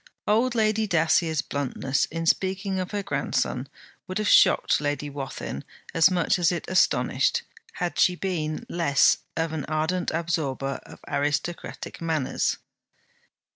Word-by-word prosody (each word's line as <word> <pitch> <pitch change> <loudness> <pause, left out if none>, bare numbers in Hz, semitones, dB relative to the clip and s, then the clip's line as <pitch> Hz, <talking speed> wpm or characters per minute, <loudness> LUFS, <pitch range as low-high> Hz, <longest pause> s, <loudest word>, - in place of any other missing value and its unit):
Old 235 +4 +2
Lady 215 -1 +2
Dacier's 160 -2 +2
bluntness 135 -1 -1
in 165 +1 -4
speaking 190 +2 0
of 185 0 -3
her 205 -1 -3
grandson - - -1 0.4
would 185 - -3
have 215 -1 -1
shocked - - +5
Lady 145 0 -2
Wathin 135 - -5 0.3
as 165 +1 +6
much 180 0 +1
as 170 -1 +3
it 175 - -3
astonished, 330 - +2 0.3
had 175 -2 -3
she 180 - +4
been 165 -5 -3
less 165 -5 +3 0.2
of 165 -1 -1
an 155 -3 -3
ardent 160 +4 -1
absorber 150 -5 -2
of - - -13
aristocratic 150 +6 -3
manners. 160 -5 0
165 Hz, 135 wpm, -25 LUFS, 150-185 Hz, 0.4 s, as